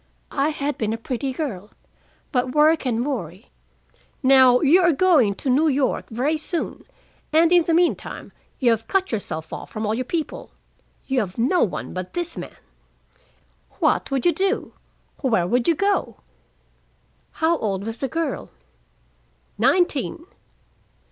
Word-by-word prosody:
I 280 +1 +1
had 295 -1 -3
been 220 -1 -1
a - - -3
pretty 255 +3 -3
girl, 235 - -5 0.6
but 250 -1 -1
work 305 -1 +4
and 240 0 0
worry 195 - -5 0.7
"Now 260 -2 +6
you 325 +5 +5
are 350 -1 +4
going 285 - +3
to 270 - -7
New 275 +5 +3
York 275 -2 0
very 275 +7 -1
soon, 335 +2 -4 0.5
and 325 +2 +4
in 350 -2 +5
the 335 - +1
meantime 345 0 -1 0.3
you 245 -3 +3
have 225 0 -1
cut 385 -1 0
yourself 160 -7 -4
off - - -7
from 215 0 -4
all 210 - 0
your 250 +3 -1
people. 315 +4 -4 0.5
You 265 -1 0
have 190 -5 -4
no 270 +10 +2
one 200 - -3
but 185 0 -6
this 345 -1 -3
man. - - -8 1.2
What - - +1
would 270 -2 -1
you 345 - +4
do? 390 +4 -1 0.5
Where 225 - +1
would 235 +6 0
you 335 - +4
go?" 400 +4 0 1.2
"How 325 +1 +1
old 195 -3 -2
was 225 +2 -5
the 270 - -1
girl?" 325 +5 -3 1.1
"Nineteen." 335 -1 +1
270 Hz, 150 wpm, -22 LUFS, 230-325 Hz, 1.2 s, Now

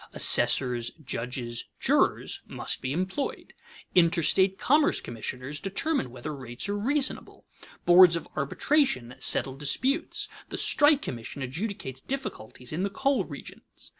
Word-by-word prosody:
Assessors, 120 -2 +4 0.2
judges, 120 -1 -3
jurors, - - +1
must - - -4
be 130 - -3
employed. 185 - -3 0.4
Interstate 180 +2 +3
commerce 295 +2 +3
commissioners 130 +5 -5
determine 195 - -2
whether 145 +5 -7
rates 120 +1 -4
are 205 - -2
reasonable, 265 +7 -2 0.4
boards 175 -1 +8
of 170 - -5
arbitration 140 - 0
settle 130 - +1
disputes, 260 - -1 0.2
the - - -4
strike 290 -1 +4
commission 120 +3 -6
adjudicates 135 - -5
difficulties 140 - -6
in 165 - -2
the 200 - 0
coal 270 +6 0
regions. - - -12
170 Hz, 120 wpm, -27 LUFS, -, 0.4 s, boards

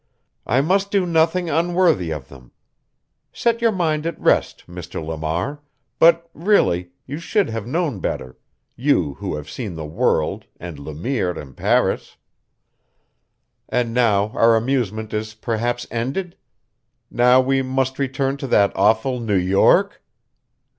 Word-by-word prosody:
I 130 +3 +3
must 195 +6 +1
do 200 -2 +1
nothing 170 +1 +1
unworthy 170 - +2
of 75 -4 -5
them. 65 -3 -16 0.8
Set 235 0 0
your 230 -1 +3
mind 160 -5 -1
at 165 - -5
rest, - - +1
Mr. 90 -1 -7
Lamar; 80 - -3 0.4
but, 170 0 +5
really, 145 - +2 0.2
you 145 +4 -6
should 200 +4 0
have 115 -1 -5
known 150 - -1
better 65 -6 -4 0.4
you 115 - +1
who - - -3
have 75 0 -7
seen 100 +2 -6
the 80 -1 -6
world 75 0 0
and 85 -4 -8
Le 75 +1 -8
Mire 90 - -2
in 70 -3 -10
Paris! - - 0 1.5
And 120 -2 0
now 110 -4 +2
our 115 +1 +4
amusement 110 -3 -1
is 110 +1 -3
perhaps 120 +2 -2
ended? 135 +10 -3 0.8
Now 125 +1 +5
we 135 +1 +2
must 130 0 -1
return 135 0 -1
to 140 - -5
that 100 -5 +3
awful 110 +6 +2
New 110 -4 -1
York? 95 +2 +3
120 Hz, 140 wpm, -21 LUFS, 95-155 Hz, 1.5 s, but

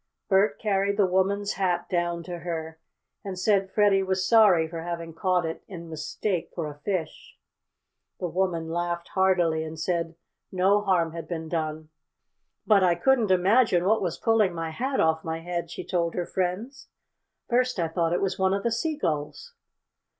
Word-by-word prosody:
Bert 195 +1 +3
carried 200 -1 0
the 205 - +4
woman's 195 +2 +1
hat 185 -2 -1
down 175 -1 -1
to 175 +1 -6
her, 160 -1 -5 0.4
and 195 -3 -5
said 195 0 +2
Freddie 205 -2 +3
was 190 -1 -1
sorry 205 -8 +5
for 165 0 -6
having 170 -1 -5
caught 180 0 +1
it 160 0 -4
in 170 -4 -9
mistake 175 +3 -3
for 170 - -2
a 150 - -6
fish. 170 -1 -4 0.8
The 180 - -2
woman 170 -1 -1
laughed 175 0 -2
heartily 175 -4 +2
and 160 0 -7
said 165 0 -2 0.4
no 195 +2 +3
harm 180 -5 +1
had 165 0 -7
been 160 -2 -4
done. 155 -1 -3 0.8
"But 210 -3 +5
I 175 -2 +4
couldn't 235 +3 +2
imagine 185 0 +3
what 220 +3 +3
was 175 -4 -2
pulling 215 -6 +2
my 165 -1 -3
hat 265 - -2
off 160 0 +2
my 160 0 -4
head," 170 0 -4
she - - -6
told 170 -2 -1
her 175 - -1
friends. 190 +11 -3 0.6
"First 250 0 +1
I 165 - +1
thought 165 0 0
it 175 - 0
was 195 - -1
one 190 0 +2
of 200 - -3
the 235 - 0
seagulls." 160 - -2
180 Hz, 170 wpm, -26 LUFS, 165-195 Hz, 0.8 s, sorry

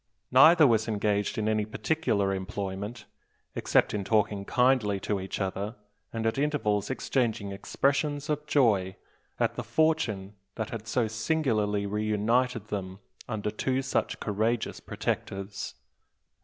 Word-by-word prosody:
Neither 155 +5 +8
was 115 -4 +3
engaged 105 +1 0
in 110 -1 0
any 110 -1 +2
particular 110 -3 0
employment, 100 +3 -4 0.5
except - - +2
in 105 -2 -1
talking 105 -1 +1
kindly 125 -5 +2
to 100 0 -1
each 95 0 -5
other, 100 +3 -3 0.4
and 115 -1 -3
at 115 +4 +1
intervals 135 -9 0
exchanging 120 -6 -1
expressions 140 +8 0
of 150 0 -2
joy 105 -11 +3 0.4
at - - +2
the - - -4
fortune 140 -12 +1 0.2
that 110 -1 -4
had 115 -1 -6
so 115 -1 +1
singularly 110 -4 0
reunited 110 +3 0
them 95 -2 -4 0.3
under 105 -2 -2
two 130 +5 -1
such 135 - -1
courageous 110 +3 -1
protectors. 100 0 -4
110 Hz, 130 wpm, -28 LUFS, 100-130 Hz, 0.5 s, Neither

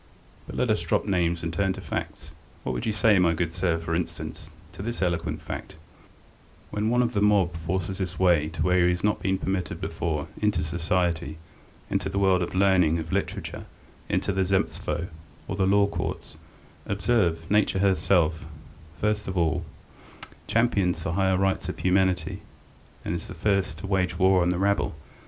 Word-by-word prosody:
But - - -8
let - - +1
us - - +1
drop - - 0
names 85 -4 0
and 85 0 -3
turn 95 +2 +1
to - - -8
facts. - - -5 0.3
What - - -2
would 115 - -3
you - - +2
say, 105 -1 +4
my 85 -2 +3
good 85 0 -1
sir, 85 -1 +1
for 85 0 -4
instance, 85 0 -4 0.2
to - - -8
this 120 +3 -4
eloquent 85 -3 -1
fact: - - -6 1.0
when 105 +1 0
one 120 +1 +3
of 120 0 -1
the 100 - +1
mob 100 -4 +3
forces 90 +3 -3
his 90 -2 -3
way 85 -4 +3
where 90 0 +3
he - - +4
has 90 0 -1
not 105 0 +1
been 95 0 +1
permitted 95 -3 -2
before, 80 -1 -2
into 105 -5 +1
society, 85 -1 -1 0.5
into - - 0
the 95 - -4
world 95 -2 +3
of 90 - -3
learning, 95 -4 +4
of 80 -1 -5
literature, - - -3 0.4
into - - 0
the 95 0 +1
Zemstvo 95 -2 -1 0.4
or 95 - -3
the 95 -1 +1
law 100 +1 +5
courts, 100 - -4 0.5
observe, 100 -6 +1
Nature 105 -2 +3
herself, 90 -4 +2 0.5
first 105 0 0
of 95 - -3
all, 85 0 +1 0.8
champions 100 -8 +1
the - - -2
higher 95 0 +2
rights 95 -1 0
of - - -4
humanity, 90 -2 +1 0.6
and - - -1
is 85 -2 -4
the 95 - -8
first 95 -2 0
to 85 - -8
wage 90 -3 0
war 95 0 +4
on 85 - +2
the 90 - 0
rabble. 100 +2 +1
95 Hz, 180 wpm, -26 LUFS, 85-100 Hz, 1.0 s, law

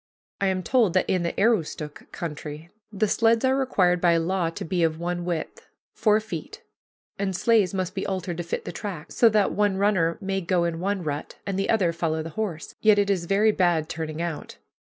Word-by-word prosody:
I 195 - +3
am 185 -1 0
told 230 -7 +3
that 185 - +3
in 185 - +1
the 170 0 -2
Aroostook 165 -8 -1
country 155 0 -6 0.2
the 210 +1 0
sleds 230 +3 +3
are 260 0 +3
required 185 -10 +2
by 170 -1 +4
law 170 +1 0
to 165 - -6
be 175 +2 -1
of 160 -1 +2
one 175 0 -3
width, 170 -3 -4 0.3
four 215 -1 +3
feet, 220 - -7 0.6
and 195 -2 -1
sleighs 215 -2 +3
must 185 -1 -2
be 195 - -3
altered 185 -3 -3
to 175 - -3
fit 165 - -4
the - - -4
track, 185 -8 -6
so 235 - +5
that 210 -2 +2
one 205 -2 +1
runner 190 -5 +2
may 195 -1 -2
go 175 0 +1
in 170 -1 -2
one 195 0 -1
rut 145 -2 -4
and 195 -1 -2
the 195 - -1
other 190 -7 +2
follow 160 -1 -1
the 165 - -7
horse. 170 -3 -4
Yet 215 -1 +5
it 200 0 +2
is 180 -3 0
very 205 +4 +3
bad 175 -5 +1
turning 160 0 -4
out. 170 -3 -5
185 Hz, 210 wpm, -25 LUFS, 165-205 Hz, 0.6 s, so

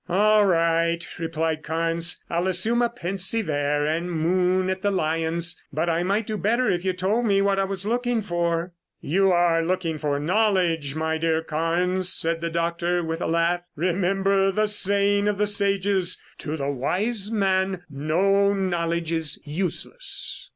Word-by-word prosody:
"All 210 +3 +4
right," 165 -1 +1
replied 160 -1 -2
Carnes. 165 +2 -2
"I'll 170 +2 -1
assume 215 +6 +1
a 240 - +2
pensive 195 -1 -1
air 145 0 0
and 165 +3 -2
moon 180 +3 +1
at 190 0 -4
the 205 - +1
lions, 165 -1 -1
but 160 +4 -1
I 165 +1 0
might 200 +4 0
do 215 0 -3
better 235 +5 +1
if 175 0 -2
you 190 - +1
told 195 +6 0
me 200 -1 +3
what 195 0 +1
I 195 - +2
was 195 0 -5
looking 240 +1 0
for." 175 -1 -2 0.3
"You 190 +5 +2
are 175 -2 +3
looking 165 -2 -2
for 145 -2 -1
knowledge, 175 -4 +1
my 160 0 -1
dear 160 0 0
Carnes," 175 +4 0
said 165 0 +1
the 170 - -2
doctor 170 +1 -1
with 165 +1 -4
a - - -1
laugh. 170 +1 +1
"Remember 195 +3 +1
the 215 +2 +1
saying 200 0 +2
of 210 -1 0
the 210 - +2
sages: 200 -2 +1 0.2
To 155 0 -4
the 140 -1 -2
wise 200 - 0
man, 190 -3 0
no 195 +8 +1
knowledge 170 -3 -1
is 160 -2 -2
useless." 180 - 0
180 Hz, 165 wpm, -24 LUFS, 165-195 Hz, 0.3 s, All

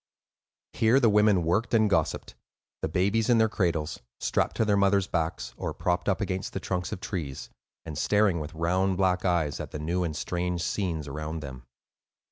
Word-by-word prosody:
Here 115 +4 +4
the 115 -5 +4
women 105 -3 +4
worked 105 +9 +1
and 110 -1 +4
gossiped,—the 100 - -3
babies 100 +7 +1
in 120 - +5
their 110 0 +4
cradles, 85 -7 -1 0.2
strapped - - 0
to 110 - +2
their 105 -1 +3
mothers' 100 -1 +3
backs, 80 -8 -2
or - - -4
propped 90 +1 0
up 95 - +1
against 95 -2 -3
the - - -2
trunks 90 -2 -3
of - - -4
trees, 85 -10 -5 0.3
and 80 -2 -6
staring 100 +2 +2
with 75 +2 -7
round 90 +3 +1
black 90 -1 +2
eyes 85 -6 +1
at - - -5
the - - -6
new 85 +4 -1
and 80 -3 -3
strange 90 0 -2
scenes 85 -7 -2
around 75 +3 -5
them. 65 -3 -9
90 Hz, 180 wpm, -27 LUFS, 80-100 Hz, 0.3 s, in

